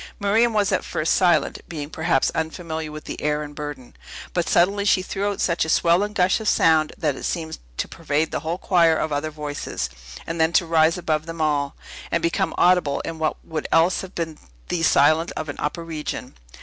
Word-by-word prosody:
Miriam 220 +4 +3
was 205 -2 +1
at 185 - +1
first 155 - 0
silent, 175 -6 +2
being 150 -2 -6
perhaps 160 -4 +1
unfamiliar 160 -1 -4
with 155 0 -8
the - - -7
air 150 0 0
and 145 0 -9
burden. 145 -4 -7 0.4
But 175 -2 0
suddenly 200 +4 +3
she 195 -2 +3
threw 200 +2 -2
out 200 - -4
such 170 -1 +1
a 160 - -3
swell 170 +3 +4
and 210 +1 -3
gush 185 +1 +3
of 220 - 0
sound, 155 -1 +3
that 150 -4 0
it - - -9
seemed 160 -2 -3 0.2
to - - -1
pervade 155 -1 -1
the - - -1
whole 165 +2 -3
choir 170 -4 +3
of 155 - -1
other 145 +2 -1
voices, 145 - -4 0.3
and 165 0 -2
then 160 +1 +3
to 175 - +4
rise 165 0 +3
above 155 -2 -1
them 165 0 -7
all, 145 -2 0 0.3
and 170 - 0
become 170 0 0
audible 175 -6 +3
in 165 -1 -6
what 155 -1 -2
would 155 -2 -4
else 165 +3 +4
have 190 0 -10
been 160 -2 -4 0.3
thee 175 - -1
silence 155 +2 +4
of 155 -1 -5
an 145 - -5
upper 165 +3 -3
region. 155 -2 -5
160 Hz, 210 wpm, -23 LUFS, 155-175 Hz, 0.4 s, swell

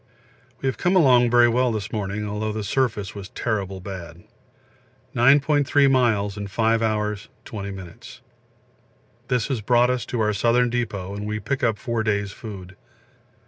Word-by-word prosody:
We - - +1
have 130 - -2
come 180 +2 +2
along 125 -8 +5
very 120 0 +6
well 125 +1 +2
this 110 -2 -4
morning, 105 0 -3
although 105 +1 -2
the 110 0 -4
surface 105 -4 -1
was 100 -2 -8
terrible 100 -4 -3
bad 90 -2 -8 0.9
9.3 140 +2 +4
miles 110 -6 +2
in 100 0 -4
5 115 +2 +1
hours 105 -2 -1 0.2
20 100 -2 -6
m. 90 -2 -11 1.3
This 125 -4 0
has 130 -5 -1
brought 120 +3 +3
us 125 -4 -2
to 120 - -3
our 105 0 +1
Southern 120 +3 +2
Depot, 105 -6 -3
and 105 +1 -5
we 105 0 -2
pick 135 +7 -3
up 110 -3 +2
4 115 -2 -2
days' 105 -2 -1
food. 95 -4 -9
110 Hz, 160 wpm, -23 LUFS, 100-125 Hz, 1.3 s, very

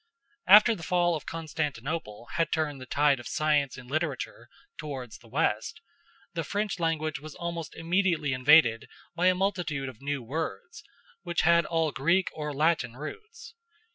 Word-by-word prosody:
After 210 +4 +8
the 195 - -8
fall 175 0 +1
of 155 - -7
Constantinople 150 -7 -4
had 165 +1 0
turned 150 -4 -1
the 130 - -9
tide 145 -2 +3
of 120 - -8
science 150 -3 +1
and 130 -1 -11
literature 140 -5 -3 0.3
towards 130 -7 -6
the 120 - -18
west, 125 - -1 0.5
the 165 -2 -2
French 205 +4 -2
language 155 -2 -1
was 155 +1 -10
almost 170 -2 -5
immediately 170 -4 +1
invaded 130 -3 +5 0.2
by 175 +2 +2
a 185 - +4
multitude 180 -8 -1
of 125 -2 -13
new 140 -2 -3
words, 165 - -5 0.4
which 175 -3 -1
had 170 0 +4
all 165 -2 +1
Greek 170 +8 +2
or 150 -1 -4
Latin 145 -4 +1
roots. 345 - -9
155 Hz, 155 wpm, -28 LUFS, 140-170 Hz, 0.5 s, After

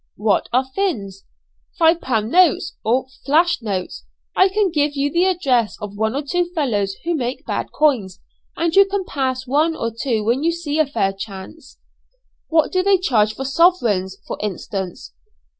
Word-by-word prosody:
'" - - -56
"What 210 0 0
are 255 +2 +2
'fins?'" 245 - -3 0.5
"Five 330 +1 +4
pound 225 -3 -1
notes, 360 -4 +3
or 250 +4 +1 0.2
flash 330 +3 +2
notes. 195 -5 -4 0.3
I 375 - +5
can 395 -1 +1
give 295 -2 0
you 285 +1 0
the 345 +2 +2
address 270 - +1
of 205 -2 -7
one 220 +3 -1
or 285 - -2
two 355 +5 0
fellows 205 -10 0
who 345 - -1
make 255 -4 -3
bad - - -3
coins, 235 -12 +1 0.4
and 335 +1 0
you 395 0 +8
can 390 -1 -2
pass 260 -4 -2
one 305 +5 +1
or 230 -5 -3
two 225 -1 -2
when 235 +5 +1
you 335 +2 +1
see 315 -3 -3
a 310 - +3
fair 195 -9 0
chance." 195 +9 -10 0.7
"What 320 -1 +2
do 370 - +2
they 390 +1 +4
charge 220 - +1
for 270 - -5
sovereigns, 240 - +2
for - - -6
instance?" 190 - -5
270 Hz, 175 wpm, -20 LUFS, 215-335 Hz, 0.7 s, you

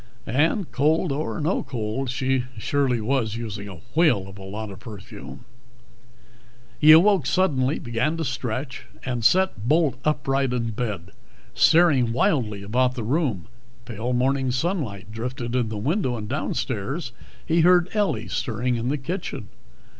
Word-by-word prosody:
And 160 - +1
cold 155 +4 +2
or 150 +5 -2
no 160 +6 0
cold, 120 +2 -3
she 130 0 0
surely 125 +2 +1
was 110 -1 0
using 105 -3 -5
a 90 -4 -10
whale 155 - +3
of 95 0 -11
a - - -9
lot 105 +2 -6
of 95 - -10
perfume. 110 +1 -10 1.3
He 155 +1 +8
awoke, 175 -2 +6
suddenly, 150 -7 +2
began 125 +7 -1
to 165 - -2
stretch, 125 +1 -4 0.2
and 120 -3 -2
sat 185 - +3
bolt 150 -5 +2
upright 135 -3 0
in 115 -2 -1
bed, 105 -5 -4 0.4
staring 150 -9 +4
wildly 120 - +1
about 125 +5 +1
the 120 - -4
room. 125 - 0 0.4
Pale 120 +2 -3
morning 130 +1 +1
sunlight 125 - -2
drifted 120 +2 -4
in 120 -3 +1
the 110 - -4
window. 130 - 0
Downstairs 130 - -3 0.3
he 165 0 +3
heard 175 +1 +5
Ellie 210 -2 0
stirring 120 0 -1
in 115 +2 -2
the 145 - 0
kitchen. 150 - -5
125 Hz, 145 wpm, -24 LUFS, 110-150 Hz, 1.3 s, He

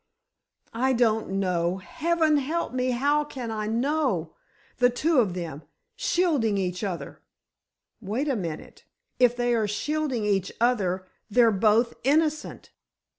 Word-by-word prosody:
"I 260 +3 +1
don't 225 -3 +1
know! 180 -1 0
Heaven 315 - +1
help 305 +2 -2
me—how 255 +4 +1
can 250 -5 -6
I 215 -1 -3
know? 235 - 0 0.4
The 245 0 +4
two 295 +4 +2
of 195 -7 +1
them, 165 -5 -5 0.3
shielding 330 - +1
each 180 0 -2
other——" 185 -4 -5 0.8
"Wait 230 +8 -2
a 275 - +1
minute, 170 -7 -6 0.4
if 245 -1 +4
they 245 0 +1
are 220 -2 +1
shielding 260 +2 -2
each 195 -2 0
other—they're 220 +1 +1
both 220 +3 +3
innocent!" 305 +3 0
235 Hz, 125 wpm, -26 LUFS, 200-285 Hz, 0.8 s, The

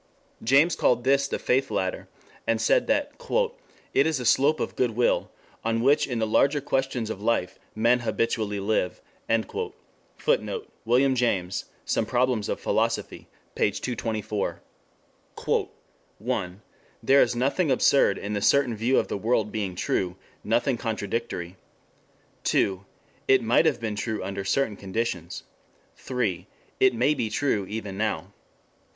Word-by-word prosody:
James 140 +8 +4
called 120 -1 +2
this 140 +1 +3
the - - -2
faith 135 +2 +1
ladder, 95 -1 -2 0.4
and 115 -1 +2
said 115 - +3
that 285 +1 +1 0.8
"it 140 - +4
is 160 -4 0
a 125 - -4
slope 140 +6 +4
of - - -3
goodwill 120 -1 +1 0.3
on 115 0 0
which 140 +3 +4
in 125 -3 -2
the 110 - +1
larger 140 +7 +3
questions 135 -5 -1
of 100 - -6
life 105 -5 0 0.2
men 120 +3 +3
habitually 110 -3 -1
live." 100 -2 0 1.2
[Footnote: 465 -2 -1 0.2
William 130 +4 +4
James, 100 -7 0 0.2
Some 110 - 0
Problems 125 -4 +1
of - - -2
Philosophy, - - -1 0.3
p. - - +2
224.] 110 -4 -3 1.6
"1. 100 -5 -3 0.4
There 135 +1 +6
is - - +2
nothing 140 +7 +1
absurd 130 -4 +4
in 105 +1 -4
a 100 - -1
certain 130 0 +3
view 115 +5 +1
of - - +2
the - - -3
world 110 -1 +1
being 100 -4 -3
true, 90 0 -1 0.3
nothing 120 +4 +1
contradictory; 105 -5 -3 0.9
2. 95 -1 +1 0.4
It 130 -2 +5
might 120 +8 +4
have 140 -6 +1
been 110 -2 -3
true 110 0 -3
under 100 +1 -4
certain 105 +2 0
conditions; 95 -4 -3 0.5
3. 115 -9 -2 0.3
It 130 -2 +4
may 125 +6 +3
be 120 -6 -2
true 105 -7 0
even 105 -2 -5
now; 110 -4 +1
4. 90 - -20
115 Hz, 140 wpm, -26 LUFS, 105-130 Hz, 1.6 s, There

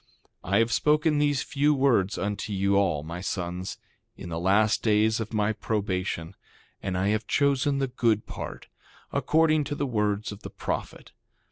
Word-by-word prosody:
2:30 95 - -7
I - - +6
have 115 +1 +2
spoken 150 +5 +2
these 145 -2 +2
few 150 +1 +2
words 120 -8 +2
unto 105 +1 -3
you 100 0 +1
all, 90 -7 +2
my 85 +3 -6
sons, 90 -1 -4 0.4
in - - -8
the 85 0 -3
last 100 +4 +3
days 110 0 +3
of 110 - -4
my 110 -1 +1
probation; 95 -5 -2 0.5
and 95 -2 -2
I 95 +2 +1
have 105 0 -1
chosen 140 0 +2
the 135 -1 0
good 115 -4 +1
part, - - -7 0.5
according 155 -1 +3
to 145 - -3
the 145 - -1
words 105 -4 -1
of 105 0 -9
the - - -7
prophet. - - -5
105 Hz, 170 wpm, -27 LUFS, 95-135 Hz, 0.5 s, I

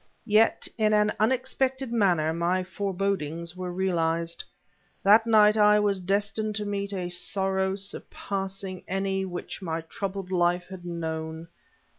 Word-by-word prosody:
Yet, 220 0 +3
in 215 -1 +3
an 210 0 +3
unexpected 260 +2 0
manner, 175 -8 +2
my 175 +2 0
forebodings 185 -4 -2
were 180 -1 -4
realized. 170 -2 -1 0.6
That 215 +4 +6
night 215 -1 +6
I 210 0 +6
was 205 -2 +1
destined 205 +3 -1
to 210 0 -2
meet 200 0 -3
a 180 -3 -3
sorrow 190 +1 0
surpassing 195 -1 -5
any 195 0 -1
which 180 +1 -6
my 165 -3 -3
troubled 190 +3 -5
life 175 0 +1
had 185 -2 -9
known. 160 -1 -4
190 Hz, 130 wpm, -27 LUFS, 175-210 Hz, 0.6 s, That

